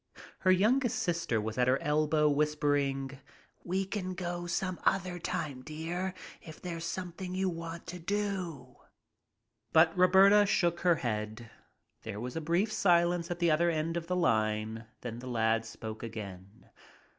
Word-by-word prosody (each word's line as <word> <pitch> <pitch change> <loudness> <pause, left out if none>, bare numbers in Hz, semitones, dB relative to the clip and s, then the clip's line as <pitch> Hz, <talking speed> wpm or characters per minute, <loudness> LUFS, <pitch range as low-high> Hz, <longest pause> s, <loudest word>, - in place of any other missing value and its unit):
Her 185 - +4
youngest 240 +6 +3
sister 170 - 0
was 110 +3 -4
at 125 - +3
her 130 +2 +3
elbow 150 +1 +2
whispering, 145 -2 0 0.4
"We 190 +2 -1
can 185 -2 -4
go 175 -1 -4
some 185 +1 -2
other 185 -2 +1
time, 145 -5 -3
dear, 170 +6 -4 0.3
if 160 -2 -11
there's 170 -2 -5
something 180 0 -5
that - - -3
you 190 0 +1
want 165 -1 -6
to 180 +1 -7
do." 180 -9 -3 0.9
But 160 0 +5
Roberta 195 +3 +6
shook 175 -4 +2
her 175 -1 +4
head. 110 -3 -4 0.5
There 110 -2 -6
was 125 +2 -5
a 165 - -2
brief 175 +8 +1
silence 175 -2 +3
at 175 - -2
the 170 -2 +2
other 170 +3 +3
end 165 0 -1
of 170 -1 -3
the 180 - 0
line, 110 -6 0
then 120 -1 -6
the 130 - -8
lad 115 -2 +1
spoke 110 -1 -7
again. 100 -3 -9
165 Hz, 155 wpm, -31 LUFS, 125-180 Hz, 0.9 s, Roberta